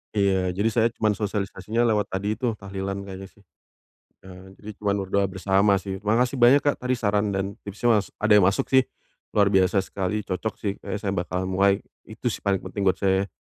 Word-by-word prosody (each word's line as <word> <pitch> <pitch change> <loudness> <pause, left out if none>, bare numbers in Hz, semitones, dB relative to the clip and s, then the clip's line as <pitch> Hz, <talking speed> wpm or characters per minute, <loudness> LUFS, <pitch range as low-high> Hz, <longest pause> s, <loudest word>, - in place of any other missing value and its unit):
Iya. 95 -3 +1
Jadi 105 +3 +1
saya 115 0 +3
cuman 110 -1 +1
sosialisasinya 105 +2 -2
lewat 105 -3 +1
tadi 100 +3 -2
tuh 120 -4 -1
tahlilan 100 0 -5
kayaknya 95 0 -8
sih, 100 +1 -24 0.8
eee, 95 +1 -13
jadi 105 - -11
cuman 100 -1 0
berdoa 100 +1 +1
bersama 95 +2 +2
sih. 95 0 -4
Terima 105 +2 +1
kasih 125 +2 -3
banyak 125 +4 +6
Kak 145 - +1
tadi 125 0 0
saran 105 -3 0
dan 95 +1 -3
tipsnya 110 +2 +2
mas 95 - -6
ada 105 +1 -1
yang 90 - +4
masuk 100 - -1
sih, 130 -1 +4 0.5
luar 100 -1 +4
biasa 95 0 +3
sekali. 100 +2 -3
Cocok 95 +4 -3
sih 100 - -2
kayaknya 105 - -5
saya 100 - 0
bakal 90 0 -2
mulai 95 +2 +2 0.2
itu 110 +2 -3
sih - - -5
paling 100 -2 -1
penting 95 +1 -3
buat 95 - +4
saya. 95 0 +1
100 Hz, 200 wpm, -24 LUFS, 95-105 Hz, 0.8 s, banyak